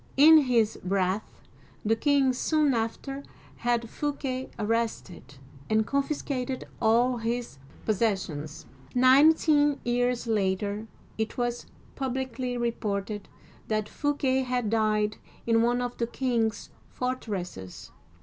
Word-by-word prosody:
In 315 +3 +9
his 240 -6 +2
wrath, 190 +2 0 0.6
the 225 +2 +3
king 275 +1 +3
soon 300 +2 +2
after 240 +4 -3 0.4
had 235 -1 0
Fouquet 265 -1 -3
arrested, 210 - -2 0.3
and 220 0 +3
confiscated 275 -2 -2 0.2
all 240 +2 +3
his 230 - -3 0.3
possessions. 190 -9 -1 0.3
Nineteen 290 +3 +5
years 245 0 0
later, 205 0 -1 0.3
it 220 - -2
was 240 -1 -2 0.3
publicly 260 -2 -3
reported 210 -3 -2 0.4
that 215 -1 -1
Fouquet 280 -2 0
had 250 -4 -1
died 215 -1 +1 0.3
in 230 -1 +3
one 240 +1 +2
of 245 0 -4
the 235 - 0
king's 235 -3 -1 0.2
fortresses. 195 - -5
235 Hz, 105 wpm, -27 LUFS, 215-260 Hz, 0.6 s, In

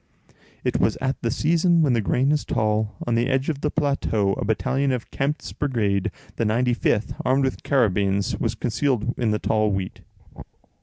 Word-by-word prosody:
It - - 0
was - - +2
at 135 0 -2
the 115 - 0
season 170 +4 +2
when 140 -5 +3
the 115 - +2
grain 130 +7 +1
is 150 -1 +1
tall; 110 -2 0
on 120 - 0
the 120 +2 +2
edge 135 +1 0
of 145 -3 -3
the 150 - 0
plateau 140 -10 0
a - - -3
battalion 115 +7 0
of 125 -3 -4
Kempt's 145 +3 -2
brigade, 105 -9 0 0.3
the - - 0
95th, 115 -1 +1
armed 130 +2 +2
with 130 - -1
carabines, 100 -6 +1
was - - -1
concealed 120 0 0
in 120 -3 +1
the 105 - +1
tall 110 +1 +1
wheat. 95 -1 -4
120 Hz, 175 wpm, -23 LUFS, 105-135 Hz, 0.3 s, when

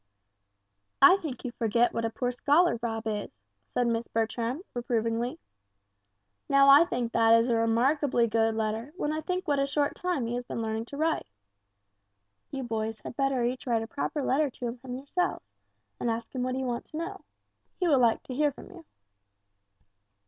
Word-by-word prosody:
"I 320 +8 +8
think 290 -9 -6
you 250 - -3
forget 235 0 +1
what 230 - -1
a - - 0
poor 245 +2 -2
scholar 290 +3 +3
Rob 225 -1 -3
is," 210 - -4 0.3
said 245 - 0
Miss 230 0 -1
Bertram, 230 +6 -2
reprovingly. 235 -2 -1 1.1
"Now 275 0 +6
I 285 +4 +9
think 240 -7 -2
that 230 0 +5
is 230 +2 +1
a 235 - +3
remarkably 235 +3 +2
good 225 0 +1
letter 220 +5 -2
when 300 -4 -1
I 310 - -2
think 365 +3 -3
what 285 -2 +2
a 275 - +1
short 285 0 0
time 355 -9 -1
he 230 - -3
has 245 0 -2
been 245 - -5
learning 220 0 -2
to 280 - -9
write. 320 - 0 1.2
You 270 -1 -4
boys 220 -2 -3
had - - -8
better 270 -2 +1
each 250 +2 -2
write 230 -2 +1
a - - -7
proper 285 +3 -3
letter 290 +3 +2
to 245 -1 -6
him 255 -1 -6
yourselves, 285 +7 -2 0.5
and 240 - -1
ask 230 0 -3
him 255 - -2
what 255 0 -1
you 265 0 -2
want 240 -1 -3
to 310 - -9
know. 385 +4 -5 0.6
He 360 - +1
will 285 -5 +4
like 235 -2 +3
to 255 - -7
hear 295 +2 +2
from 280 - -13
you." 350 -3 -12
245 Hz, 185 wpm, -28 LUFS, 230-285 Hz, 1.2 s, I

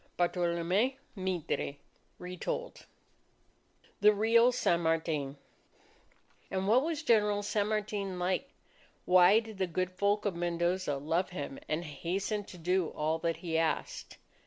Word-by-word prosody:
Bartolome 175 +7 +1 0.2
Mitre 185 -7 -2 0.4
(Retold) 180 - -5 1.1
THE 210 +1 +7
REAL 230 +4 +4
SAN 175 -8 +1
MARTIN 160 -4 -1 1.1
And 190 0 -2
what 235 +5 +5
was 315 0 -2
General 210 -5 +3
San 205 0 0
Martin 205 -3 -2
like? 185 +9 -1 0.6
Why 180 +3 +6
did 220 -3 -10
the 190 - +1
good 185 +2 -2
folk 200 +3 0
of 200 -4 0
Mendoza 175 -2 0
love 165 +6 -1
him 145 -6 -6
and 160 +3 -1
hasten 195 +7 -3
to 180 - -11
do 180 +1 +1
all 155 +2 0
that 165 0 -1
he 160 -1 +1
asked? 165 -1 -2
185 Hz, 130 wpm, -31 LUFS, 170-210 Hz, 1.1 s, THE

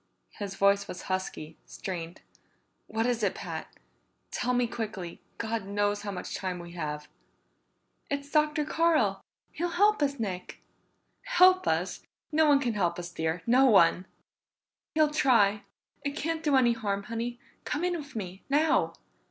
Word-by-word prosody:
His 200 -2 -4
voice 200 0 +3
was 180 - -7
husky, 185 -4 -4
strained. 175 -2 -6 0.7
"What 225 +1 -1
is 245 -2 0
it, 200 -3 +1
Pat? 165 -4 -5 0.6
Tell 250 - -1
me 245 0 +2
quickly 215 -7 -5 0.2
God 225 -3 -3
knows 205 0 0
how 205 - -5
much 185 -3 -5
time 185 -2 -3
we 175 0 -9
have!" 150 -3 -4 1.0
"It's 285 0 -3
Dr. 300 -1 +2
Carl. 330 +1 +2 0.3
He'll 350 +2 -2
help 410 +2 +3
us, 280 -2 0
Nick." 185 -5 -4 0.7
"Help 370 -6 +5
us! - - 0 0.3
No 315 0 +4
one 285 -1 +6
can 245 -4 -1
help 175 -5 0
us, 175 0 -6
dear. 160 0 -2
No 255 +3 +5
one!" 185 -4 +5 0.9
"He'll 310 -1 +4
try. 220 -9 +4 0.4
It 285 0 -2
can't 325 +1 -2
do 295 -3 +2
any 245 -3 +5
harm, 200 -3 -2
Honey. 235 +1 -4 0.2
Come 300 - -2
in 360 0 +1
with 290 -6 -8
me. 190 -3 -5
Now!" 300 +3 +3
225 Hz, 150 wpm, -29 LUFS, 190-290 Hz, 1.0 s, one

